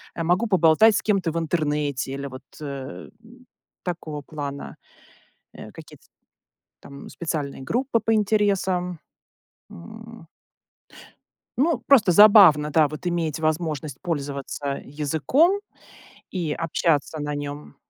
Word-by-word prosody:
э, 165 - -3
могу 180 +7 +1
поболтать 190 +3 +5
с - - -1
кем-то 195 -6 0
в 165 - -4
интернете 150 -4 -2
или 140 0 -5
вот, 130 0 -10 0.2
э, - - -5 0.6
м, 245 +2 -18 0.4
такого 160 -4 -5
плана, 140 -1 -7 0.8
э, - - -11
какие-то - - -14 0.8
там 140 0 -12
специальные 150 -5 -4
группы 235 - -1
по 225 +1 +1
интересам. 195 -5 0 0.7
М 220 - -12 1.3
ну, 320 +5 +2
просто 220 -10 +5
забавно, 180 -7 +7
да, 155 -1 +3
вот 155 +4 -9
иметь 165 -4 -1
возможность 155 -3 -2
пользоваться 140 -4 -4
языком 160 - +1 0.7
и 170 -5 -3
общаться 160 -1 -1
на 145 0 -3
нем. 145 0 -7
165 Hz, 115 wpm, -23 LUFS, 145-200 Hz, 1.3 s, забавно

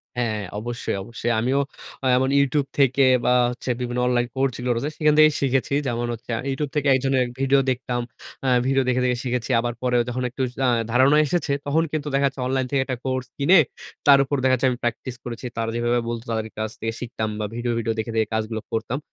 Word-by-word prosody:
হ্যাঁ 115 -3 -1 0.2
অবশ্যই, 120 -2 -3
অবশ্যই। 115 +2 -3
আমিও 130 +4 +1 0.4
আ - - -2
এমন 130 +1 +1
YouTube 140 0 +1
থেকে, 135 0 +4 0.2
বা 125 - +4 0.2
হচ্ছে 125 +1 -7
বিভিন্ন 125 0 -2
অনলাইন 120 -1 +1
কোর্সগুলো 125 -2 0
রয়েছে, 140 +6 -2
সেখান 150 -1 +3
থেকেই 155 -1 +7
শিখেছি। 135 0 +1
যেমন 120 0 -1
হচ্ছে, 115 +1 -11
আমি 130 - -5
YouTube 140 +1 -3
থেকে 145 -1 +1
একজনের 130 -1 +2 0.2
ভিডিও 135 0 +4
দেখতাম। 125 -1 -1 0.4
আ - - +1 0.2
ভিডিও 135 0 +3
দেখে, 125 0 +2
দেখে 125 -1 +1
শিখেছি। 125 0 -2
আবার 120 0 -1
পরেও 125 -1 +2
যখন 125 +1 -3
একটু 130 +2 -6 0.2
আ - - +4 0.2
ধারণা 130 +4 +5
এসেছে, 155 -2 -1
তখন 155 +3 +2
কিন্তু 150 -1 -3
দেখা 140 0 +3
যাচ্ছে 135 -1 -6
অনলাইন 130 0 0
থেকে 140 -1 +2
একটা 130 -3 -3
কোর্স 130 -1 -1
কিনে, 165 +6 +6 0.5
তার 140 -1 +8
উপর 145 +2 -2
দেখা 130 - +4
যাচ্ছে 130 +1 +1
আমি 120 - -3
প্র্যাকটিস 120 +1 -3
করেছি। 120 +1 -7
তারা 115 0 -1
যেভাবে 120 +1 +1
বলতো, 115 -1 -4
তাদের 110 -1 -1
কাছ 110 0 -2
থেকে 115 0 -2
শিখতাম 110 -3 -3
বা 105 - -1
ভিডিও, 120 0 -1
ভিডিও 115 0 -1
দেখে, 115 +1 -3
দেখে 110 -1 +2
কাজগুলো 110 0 -2
করতাম। 115 +3 -2
125 Hz, 210 wpm, -23 LUFS, 120-135 Hz, 0.5 s, তার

